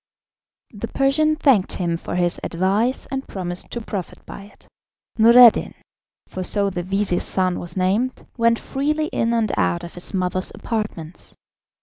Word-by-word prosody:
The 210 Hz, +2 st, -6 dB
Persian 300 Hz, +5 st, +1 dB
thanked 270 Hz, -11 st, +3 dB
him 170 Hz, -2 st, -1 dB
for 165 Hz, -, -6 dB
his 175 Hz, -1 st, 0 dB
advice, 200 Hz, +9 st, 0 dB
and 270 Hz, 0 st, -4 dB
promised 175 Hz, -2 st, -4 dB
to 235 Hz, -, -5 dB
profit 200 Hz, -5 st, -7 dB
by 200 Hz, -, -10 dB
it. 205 Hz, -, -20 dB, 0.5 s
Noureddin 235 Hz, +1 st, +7 dB, 0.5 s
for 185 Hz, -, -6 dB
so 200 Hz, +2 st, 0 dB
the 180 Hz, -, -3 dB
vizir's 195 Hz, 0 st, -1 dB
son 185 Hz, -1 st, +2 dB
was 175 Hz, +1 st, -7 dB
named 205 Hz, +8 st, 0 dB
went 230 Hz, -1 st, +2 dB
freely 300 Hz, +5 st, -2 dB
in 230 Hz, -, 0 dB
and 230 Hz, -3 st, +1 dB
out 90 Hz, -2 st, 0 dB
of 170 Hz, -, -9 dB
his 175 Hz, -, -2 dB
mother's 185 Hz, -1 st, -1 dB
apartments. 210 Hz, -8 st, -5 dB
200 Hz, 150 wpm, -21 LUFS, 180-235 Hz, 0.5 s, Noureddin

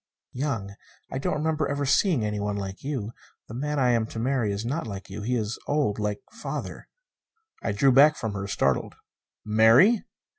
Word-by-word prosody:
"Young. 125 Hz, -7 st, -3 dB, 0.4 s
I 130 Hz, -, -2 dB
don't -, -, -1 dB
remember 155 Hz, 0 st, 0 dB
ever 140 Hz, 0 st, -1 dB
seeing 145 Hz, -, +3 dB
anyone 105 Hz, -1 st, -2 dB
like 95 Hz, -1 st, -6 dB
you. 130 Hz, -7 st, -3 dB, 0.4 s
The -, -, -9 dB
man 150 Hz, +4 st, -2 dB
I 125 Hz, -3 st, +3 dB
am 115 Hz, -2 st, +1 dB
to 115 Hz, -, -9 dB
marry 120 Hz, -2 st, 0 dB
is 100 Hz, +3 st, -3 dB
not 140 Hz, +3 st, -2 dB
like 100 Hz, -2 st, -7 dB
you. 105 Hz, -, -6 dB
He 125 Hz, +4 st, -1 dB
is 110 Hz, 0 st, -2 dB
old, 145 Hz, -8 st, 0 dB
like 105 Hz, -1 st, -2 dB
father -, -, -6 dB, 0.4 s
" 445 Hz, -1 st, -41 dB
I 110 Hz, -, 0 dB
drew 130 Hz, +7 st, +3 dB
back 145 Hz, +4 st, +6 dB
from 110 Hz, -7 st, -4 dB
her, 100 Hz, 0 st, -4 dB
startled. 70 Hz, -8 st, 0 dB, 0.5 s
"Marry?" 115 Hz, -, +5 dB
115 Hz, 185 wpm, -26 LUFS, 105-145 Hz, 0.5 s, back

